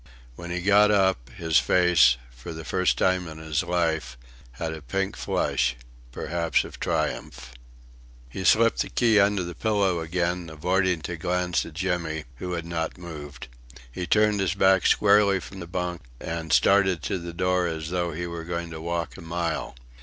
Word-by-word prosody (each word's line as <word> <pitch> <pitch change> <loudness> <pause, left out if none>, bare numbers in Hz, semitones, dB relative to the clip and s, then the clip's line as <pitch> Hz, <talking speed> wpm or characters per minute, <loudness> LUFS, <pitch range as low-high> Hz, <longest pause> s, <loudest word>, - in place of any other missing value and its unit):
When 85 +4 -8
he 90 0 -2
got 105 +2 +5
up, 95 -11 +2
his 80 -2 +2
face 90 -9 +4
for 60 +7 -9
the 80 0 -8
first 90 +1 +1
time 95 -2 +1
in 80 -1 -9
his 80 -1 -1
life 80 -6 -1 0.4
had 80 +6 -4
a 80 - -8
pink 95 +6 -2
flush 65 -1 0 0.4
perhaps 85 +5 0
of - - -11
triumph. - - -3 0.8
He 95 +10 -6
slipped 115 +6 +4
the - - -3
key 115 -3 +3
under 100 -1 +3
the 85 0 -6
pillow 100 -2 +1
again, 85 +1 -2
avoiding 90 +2 0
to 85 +2 -5
glance 90 +1 -1
at 80 - -11
Jimmy, 85 -4 -2
who 90 +5 -4
had 85 -1 -3
not 80 -1 -3
moved. 75 -6 -9 0.4
He 90 +7 -5
turned 105 -1 +3
his 95 -2 0
back 95 -2 +4
squarely 100 -1 +4
from 95 +3 -10
the 85 - -7
bunk, 90 -1 -3 0.2
and 80 -1 -5
started 95 -4 +4
to 95 - -2
the 85 0 -7
door 90 +1 +1
as 80 -1 -4
though 90 -1 -1
he 85 +3 -4
were 85 -1 -6
going 85 0 -4
to 80 -1 -7
walk 85 -1 -3
a - - -10
mile. 85 -3 -3
85 Hz, 175 wpm, -25 LUFS, 80-95 Hz, 0.8 s, got